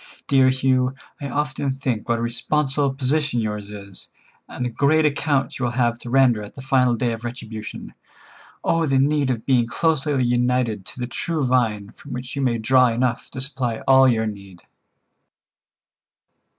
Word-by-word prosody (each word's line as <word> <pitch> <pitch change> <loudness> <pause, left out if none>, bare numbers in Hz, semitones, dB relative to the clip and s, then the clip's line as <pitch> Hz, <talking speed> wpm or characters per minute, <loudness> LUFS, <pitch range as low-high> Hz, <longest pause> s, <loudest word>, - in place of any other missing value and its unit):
Dear 135 -2 +4
Hugh, 130 0 +1 0.3
I 140 - -4
often 145 -1 -2
think 130 -5 -3
what 115 - +2
a 115 - -3
responsible 140 +4 0
position 140 0 0
yours 105 -2 -3
is, 100 -2 -9 0.4
and 125 - -4
the - - -1
great 155 +5 +3
account 145 -2 0
you 125 - 0
will 120 - -2
have 120 -2 +1
to 120 - -8
render 125 -4 +4
at 105 - -10
the 135 - -8
final 130 -2 +3
day 120 0 -1
of 115 +1 -7
retribution. 115 -3 -7 0.7
Oh, 165 -1 +1
the 135 -1 +2
need 140 0 +2
of 115 -3 -2
being 125 -4 +3
closely 150 -1 0
united 120 -4 0
to - - -7
the 125 - -2
true 150 +4 -2
Vine 110 -5 0
from - - -11
which 125 +1 -6
you 140 - -2
may 125 -3 +1
draw 125 +3 +4
enough 120 0 -1
to 130 - -7
supply 130 -4 -2
all 135 0 +7
your 110 -3 +2
need!" 100 -4 -8
125 Hz, 175 wpm, -22 LUFS, 115-135 Hz, 0.7 s, all